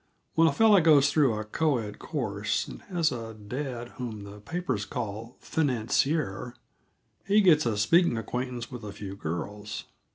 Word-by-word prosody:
When 165 0 +5
a - - +4
fellow 215 -4 +6
goes 145 -3 +6
through 140 -8 +3
a 110 - -3
co 145 +6 +1
ed 105 -3 -6
course, - - -2
and - - -9
has 170 -4 +1
a 115 -3 -6
dad 120 +3 -5
whom 110 -5 -5
the 100 +1 -10
papers 150 - -2
call 115 0 -5
financier, 125 -3 0 0.7
he 205 +2 +5
gets 160 -9 +5
a 110 -3 0
speaking 120 - +4
acquaintance 125 +2 -4
with 120 -3 -7
a 105 - -6
few 100 -1 -7
girls. 105 +5 -5
120 Hz, 160 wpm, -28 LUFS, 105-155 Hz, 0.7 s, fellow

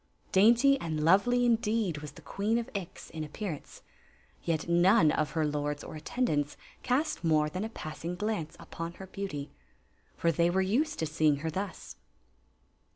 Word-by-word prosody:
Dainty 240 +8 +5
and 155 -2 -2
lovely, 245 +8 +4
indeed, 220 -7 +1
was 150 0 -8
the 160 - -14
Queen 205 +9 0
of 235 - -3
Ix 195 -4 -6
in 155 -1 -4
appearance; 155 0 -6 0.6
yet 165 -2 -1
none 175 -1 +5
of 155 - -1
her 160 -2 +1
lords 145 0 -2
or - - -8
attendants 150 - -1 0.2
cast 285 - 0
more 155 -2 +3
than 185 +5 -3
a 220 - -3
passing 165 -3 -6
glance 205 -5 -2
upon 165 +1 -6
her 190 - -9
beauty. 190 -7 -5 0.7
For 170 - +2
tliey 170 +2 +2
were 190 - +1
used 265 +11 +1
to 160 - -1
seeing 155 -1 +2
her 160 - 0
thus. 190 +3 -5
175 Hz, 160 wpm, -30 LUFS, 155-215 Hz, 0.7 s, Dainty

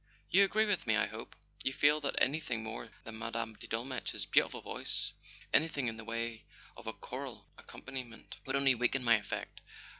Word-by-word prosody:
"You 195 +2 +8
agree 215 +2 +3
with 205 - 0
me, 110 - +4
I 110 +1 +4
hope? 110 +3 -8 0.3
You 130 - +2
feel 145 +3 +4
that 140 - -1
any¬ 150 +4 +3
thing 115 -6 -2
more 110 +1 -5
than 110 0 -7
Mme. 115 0 -2
de - - -9
Dolmetsch's 120 +3 -2
beautiful - - +3
voice - - -2 0.4
—anything 150 -4 +3
in 115 -1 -2
the 115 - -7
way 115 0 -3 0.3
of - - -11
a - - -1
choral - - -6
accompaniment— 125 -4 -8
would 135 - 0
only 140 -1 +6
weaken 125 +2 +1
my 115 -2 +6
effect? 105 -1 -5
120 Hz, 185 wpm, -34 LUFS, 115-140 Hz, 0.4 s, You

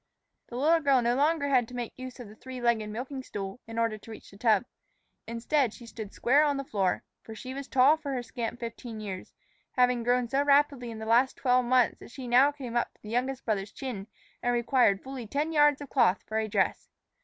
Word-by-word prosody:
The 240 - -9
little 310 +6 +4
girl 280 -4 +4
no 235 +1 +2
longer 290 +2 +2
had 250 -4 +3
to 250 - -10
make 240 -2 -4
use 255 0 -9
of 245 - -8
a 205 - -12
three 255 +3 -9
legged 235 -3 +1
milking 255 +5 -5
stool 195 -3 -6
in 225 0 -7
order 230 -2 0
to 225 - -15
reach 220 - -11
the 200 - -14
tub. 220 -1 +3 0.6
Instead, 235 +2 0
she 240 - -12
stood 220 -3 -8
square 280 +5 +3
on 290 -2 +1
the 275 - -3
floor. 195 -8 0 0.2
For 220 - -10
she 255 +4 -7
was 275 0 -6
tall 270 +4 +5
for 295 -3 -5
her 250 -2 -2
scant 235 0 -5
fifteen 230 -1 -6
years, 195 -3 -6 0.4
having 250 -1 +3
grown 245 +1 +1
so 270 +4 +1
rapidly 280 -3 +3
in 225 - -7
the 220 - -6
last 240 +4 +3
twelve 250 -1 +2
months 250 -1 +3
that - - -12
she 255 +1 -8
now 255 +4 +5
came 260 -5 -7
up 240 - +1
to - - -31
the 210 - -9
youngest 255 +3 -1
brother's 205 -2 -1
chin, 225 -7 -6 0.3
and 245 - +1
required 235 -4 +3
fully 260 -3 -7
ten 295 +7 -1
yards 295 -2 +4
of 285 - -8
cloth 235 -8 +3
for 220 0 -1
a 220 - -1
dress. 200 -2 0
245 Hz, 230 wpm, -28 LUFS, 225-270 Hz, 0.6 s, tall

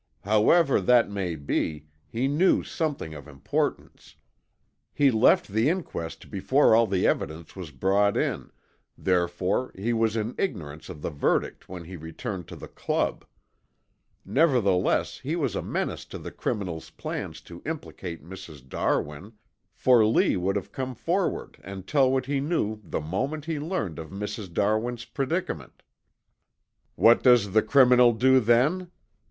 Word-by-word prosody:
However 110 - +3
that 120 +2 +4
may 95 -4 -2
be, 75 +1 -2 0.2
he 120 - -1
knew 155 +7 +3
something 150 - -3
of 75 -1 -10
importance. 70 -2 -3 0.8
He 140 -2 +4
left 110 -1 +4
the 110 +7 +2
inquest 160 - -5
before 120 +7 +3
all 115 0 +5
the 95 -2 0
evidence 80 +2 -2
was 90 -5 -7
brought 100 +8 +1
in, - - -2 0.5
therefore 90 +6 0
he 110 +5 -1
was 115 -1 +1
in 110 +2 -2
ignorance 80 - -4
of 75 - -9
the - - -2
verdict 75 - -1
when 90 -2 -7
he 90 +2 -9
returned 80 +3 -6
to - - -9
the - - -9
Club. - - -2 1.0
Nevertheless 125 - +2
he - - -3
was - - -1
a - - -1
menace - - -3
to - - -8
the - - -8
criminal's 90 -7 -4
plan - - -5
to 85 +3 -12
implicate 95 - -6
Mrs. 85 -7 -11
Darwin, 75 - -2 0.4
for 125 -3 +4
Lee 110 +1 +3
would 95 +1 -2
come 130 -1 -4
forward 180 - -2
and 95 0 -8
tell 135 -1 +3
what 130 -1 0
he 140 +1 -1
knew 135 -8 -1
the 85 - -4
moment 130 - -3
he 160 -2 -2
learned 145 - -3
of 80 -1 -8
Mrs. 105 0 -6
Darwin's 110 +5 0
predicament. 135 - -4 1.1
What 115 +1 +5
does 120 -6 +5
the 110 - +5
criminal 125 0 +5
do 130 +3 +4
then? 130 +11 +2
105 Hz, 145 wpm, -26 LUFS, 85-130 Hz, 1.1 s, all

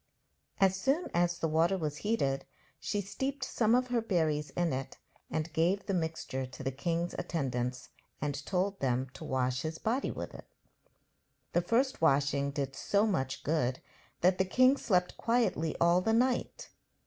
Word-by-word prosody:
As 190 -1 +4
soon 275 - +1
as 175 0 +2
the 165 - 0
water 165 +4 +2
was 150 -4 -3
heated 140 -11 0 0.3
she 205 - -1
steeped 265 +8 -3
some 230 -2 +2
of 250 0 +1
her 240 -1 +1
berries 160 -8 0
in 175 -4 0
it 135 +1 -4 0.3
and 160 +1 -3
gave 180 +5 +1
the 195 - -1
mixture 160 -6 -2
to 125 - -9
the 135 - -1
king's 165 +6 -2
attendants 125 -5 -2 0.3
and 145 -1 -3
told 195 +1 0
them 130 -1 0
to - - -9
wash 130 0 0
his 160 +1 -4
body 240 +9 0
with - - -5
it. - - -11 1.1
The 175 - +3
first 240 +7 +1
washing 140 -2 +3
did 140 -2 -3
so 200 +8 +2
much 135 - -1
good 135 -5 0 0.4
that 180 +1 +4
the - - +5
king 255 +8 +5
slept 180 -9 0
quietly 230 -9 +1
all 170 +1 +4
the 225 +4 +1
night. 250 +2 0
170 Hz, 165 wpm, -31 LUFS, 140-205 Hz, 1.1 s, the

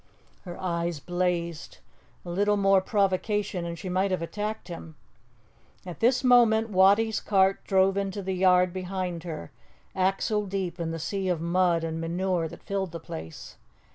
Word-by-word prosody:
Her 175 -1 -8
eyes 170 -3 -2
blazed. 175 -1 -2 0.5
A 175 - -5
little 205 +3 +2
more 195 -1 +4
provocation, 200 -1 0
and 170 0 -5
she 185 - -7
might 185 +2 +1
have 185 -3 -1
attacked 210 +5 -4
him. 165 -3 -9 0.9
At 175 -2 -8
this 250 +3 +3
moment 230 -3 +4
Wattie's 205 +4 +4
cart 195 -1 +2
drove 190 0 +3
into 200 0 -2
the 190 0 -2
yard 180 -1 +3
behind 185 -2 -4
her, 155 - -6 0.4
axle 195 +2 0
deep 185 -2 -3
in 165 -1 -2
the 165 - -3
sea 190 +4 -2
of 175 -3 0
mud 170 0 +1
and 165 0 -3
manure 175 0 -1
that - - -12
filled 190 -3 -3
the 165 - -5
place. 80 - -9
185 Hz, 160 wpm, -27 LUFS, 170-200 Hz, 0.9 s, more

